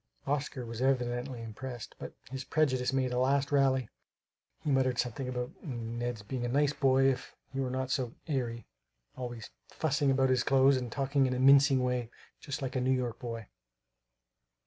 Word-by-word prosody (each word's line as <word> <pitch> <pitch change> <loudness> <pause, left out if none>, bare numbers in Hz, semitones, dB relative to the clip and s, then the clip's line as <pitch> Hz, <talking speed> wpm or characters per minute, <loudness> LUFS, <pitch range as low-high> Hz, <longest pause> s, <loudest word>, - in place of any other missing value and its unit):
Oscar 140 -3 -2
was 115 +1 -6
evidently 125 -1 0
impressed. 120 +1 -7
But - - -8 0.2
his 135 0 -4
prejudice 130 -4 +1
made 130 -1 0
a 125 - +1
last 140 +2 +2
rally. 135 -3 +3 0.8
He 150 - 0
muttered 130 -2 +2
something 125 +2 -2
about 125 -1 -3
Ned's 120 -3 -4
being 125 +4 -4
a - - 0
nice 145 +3 +2
boy 135 -2 +3
if 130 -1 0 0.2
he 135 - -3
were 130 -1 0
not 130 +1 -2
so 130 -4 -1
"airy;" 120 -6 -2 0.5
always 120 -3 -6 0.2
"fussing 145 -2 0
about 130 -1 +3
his 130 - +3
clothes 135 0 +5
and 125 -2 -4
talking 135 +1 +1
in 125 - -1
a - - -2
mincing 135 0 +6
way 125 -2 -1 0.3
just 140 -1 -5
like 130 0 -3
a 130 - +1
New 130 - +1
York 125 -3 0
boy." 115 -2 -5
130 Hz, 175 wpm, -31 LUFS, 125-135 Hz, 0.8 s, mincing